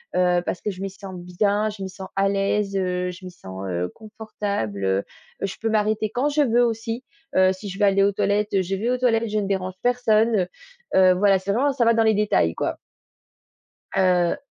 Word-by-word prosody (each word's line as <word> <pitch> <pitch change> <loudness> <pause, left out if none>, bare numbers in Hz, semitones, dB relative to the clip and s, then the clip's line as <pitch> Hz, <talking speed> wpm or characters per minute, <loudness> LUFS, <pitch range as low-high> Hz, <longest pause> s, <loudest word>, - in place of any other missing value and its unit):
heu, 180 -1 +3
parce - - -3
que - - -2
je 190 0 -9
m'y 195 - -3
sens 190 -1 -9
bien, 200 +4 0
je 210 -2 -9
m'y 190 - -4
sens 190 0 -9
à 195 0 +2
l'aise, 195 0 0
heu, 180 -1 -1
je 185 +1 -12
m'y 180 - -7
sens, 95 - -9
heu, 90 0 -2
confortable, 205 - -4
heu, 95 0 +2 0.4
heu, - - +1
je 195 - -6
peux 225 - 0
m'arrêter 215 0 +1
quand 255 +6 0
je 295 +1 +1
veux 245 -3 +3
aussi, 225 +2 -3 0.3
heu, 185 0 +5
si 195 +2 -9
je 195 +2 -7
veux 205 - +4
aller 195 0 +4
aux 200 - +3
toilettes, 200 0 +1
je 190 +1 -2
vais 220 +5 -2
aux 250 - +1
toilettes, 230 -3 +1
je 215 0 0
ne 200 - -2
dérange 190 -1 -2
personne, 230 -2 +3
heu, 180 - +1 0.5
heu, 185 -1 +6
voilà, 195 0 +4
c'est 195 +2 -2
vraiment 265 +7 +2
ça 260 -3 +1
va 230 - +5
dans 225 - +3
les 220 0 +4
détails, 210 0 +2
quoi. - - -2 1.2
Heu 180 -2 +2
200 Hz, 225 wpm, -23 LUFS, 185-220 Hz, 1.2 s, heu